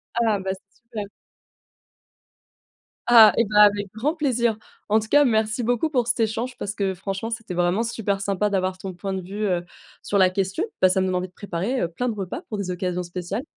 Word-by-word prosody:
Ah! 225 -3 +2
Bah, 190 0 -3
c'est 195 +1 -17
super. 225 -4 -7 2.0
Ah 225 -3 +8
et 230 - +4
bah, 210 0 +4
avec 205 -1 +3
grand 255 +8 -1
plaisir. 240 -8 +1 0.3
En 215 +1 +3
tout 220 - -6
cas, 290 +5 +5
merci 220 0 +1
beaucoup 245 +6 +1
pour 250 -6 0
cet 240 0 0
échange 230 +3 -1
parce 205 - -4
que, 195 -2 -1
franchement, 195 +4 -4
c'était 225 -4 -5
vraiment 175 +5 +1
super 210 -4 -2
sympa 200 +1 0
d'avoir 185 -1 -1
ton 190 0 -7
point 190 +2 -5
de 190 - -3
vue, 200 +4 -4
heu, 175 -3 0 0.4
sur 200 - 0
la 185 -1 +5
question. 195 - -1 0.2
Bah 185 - +6
ça 190 +1 +2
me - - +1
donne 185 - -1
envie 180 0 -1
de 185 - -26
préparer, 205 +7 -3
heu, 170 - +1
plein 245 +9 -3
de 225 - -3
repas 195 -3 -5
pour 215 - -3
des 195 -2 -3
occasions 180 0 -2
spéciales. 180 +6 -5
205 Hz, 215 wpm, -23 LUFS, 185-230 Hz, 2.0 s, Ah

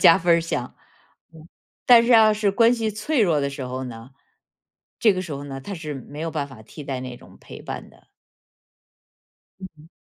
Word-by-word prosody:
加 165 - +7
分 170 0 +3
儿 - - +1
项。 130 -7 -4 0.6
嗯， 160 0 -14 0.4
但 240 -2 +8
是 235 - -2
要 220 -2 +7
是 210 -1 +1
关 230 +4 +4
系 225 -2 -1
脆 225 +7 -1
弱 160 -6 +2
的 140 - -1
时 140 -1 -7
候 130 +1 -5
呢， 115 +1 -9 0.9
这 215 -3 +4
个 185 0 -3
时 170 - -7
候 140 0 -6
呢， 135 -1 -7
它 200 +8 -7
是 155 -3 -6
没 140 +3 -9
有 165 0 -3
办 145 -3 -3
法 120 -5 -13
替 150 - -11
代 135 -2 -4
那 125 -1 -7
种 - - -17
陪 - - -12
伴 - - -7
的。 - - -24 1.5
嗯 190 - -7
嗯。 155 - -17
160 Hz, 220 characters per minute, -23 LUFS, 135-205 Hz, 1.5 s, 但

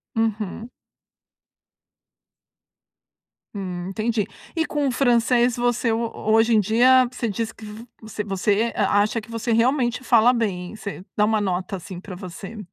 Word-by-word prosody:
Uhum. 225 0 -2 2.9
Hum, 180 -3 -5
entendi. 215 +1 -1 0.3
E 325 - +2
com 295 -3 -1
o - - +1
francês, 245 -1 +3
você 240 -1 +1
ho 230 +1 -1
hoje 225 +2 +2
em - - +5
dia, 245 +5 +5
você 250 -2 -3
diz 225 +1 -3
que 220 - -13
v 210 +2 -9 0.2
você 215 -1 -6
você 205 +3 0
a 205 0 +2
acha 215 +3 0
que 220 - -14
você 230 +1 -2
realmente 245 +2 +1
fala 235 -1 +5
bem? 200 -5 -2
Você 200 -3 -7
dá 210 - +4
uma 215 0 +1
nota, 190 0 -2
assim, 180 0 -9
para 185 0 -9
você. 190 +4 -9
220 Hz, 150 wpm, -23 LUFS, 205-235 Hz, 2.9 s, em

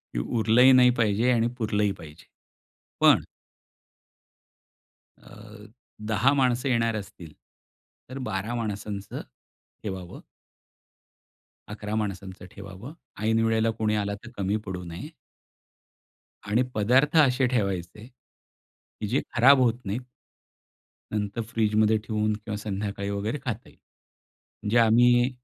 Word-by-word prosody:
हे - - 0
उरलंही 115 - +4
नाही 125 -1 +7
पाहिजे 115 +3 +2
आणि 115 -1 +2
पुरलंही 105 -3 0
पाहिजे. 75 0 -13 0.8
पण - - +5 1.9
अ, 105 0 -14 0.4
10 110 +5 +3
माणसे 130 -1 +1
येणार 115 -2 +1
असतील. 90 -6 -9 0.8
तर 135 - -6
12 110 -1 -3
माणसांचं 105 -3 -5 0.6
ठेवावं. 95 - -6 1.5
11 105 0 -5
माणसांचं 100 -3 -4
ठेवावं. 100 - -10 0.3
ऐनवेळेला 115 0 +2
कोणी 110 -1 +1
आला, 100 -1 -1
तर 115 - -10
कमी 100 +1 0
पडू 90 -1 -5
नये. 85 - -8 1.4
आणि 115 +5 +2
पदार्थ 130 +9 +3
असे 130 0 +1
ठेवायचे, 100 -3 -2
की 125 -3 -14
जे 130 +6 +1
खराब 130 +3 +6
होत 120 -2 +3
नाही. 100 +4 -3 1.1
नंतर 105 +2 -2
फ्रिजमध्ये 110 -1 +2
ठेवून 110 0 -1
किंवा 105 0 -5
संध्याकाळी 100 -1 -4
वगैरे 105 +7 -2
खाता 125 -1 -4
येईल. - - -21 0.9
जे 120 - +4
आम्ही 120 +2 +5
110 Hz, 110 wpm, -26 LUFS, 100-120 Hz, 1.9 s, नाही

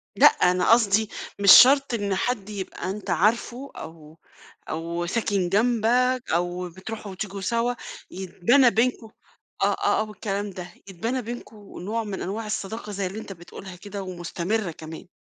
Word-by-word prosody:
لأ، - - +6
أنا 180 +3 +3
قصدي 220 -2 +4 0.3
مش 200 -2 +7
شرط 275 +2 +8
إن 200 -4 -1
حد 215 -1 -2
يبقى 190 -2 -5
أنت 200 -1 -6
عارفه 235 +8 0
أو 160 -1 -11 0.5
أو 170 +2 -3
ساكن 195 -2 0
جنبك 245 +4 +2
أو 175 +1 -1
بتروحوا 200 +3 -8
وتيجوا 195 +1 -6
سوا، 235 +4 0 0.4
يتبنى 230 +8 +3
بينكم 230 -1 0 0.5
آه، - - +6
آه، - - +1
آه، - - +1
والكلام 205 -1 -3
ده، 180 -1 -8 0.2
يتبنى 230 +8 -3
بينكم 235 -1 -8 0.2
نوع 220 +5 -2
من 205 -2 -5
أنواع 215 +4 -4
الصداقة 210 +1 -4
زي 195 -1 -2
اللي 205 +4 -6
أنت 195 - -8
بتقولها 180 +2 -11
كده 200 +1 -7
ومستمرة 180 +2 -3
كمان. 160 +2 -10
200 Hz, 150 wpm, -25 LUFS, 180-230 Hz, 0.5 s, شرط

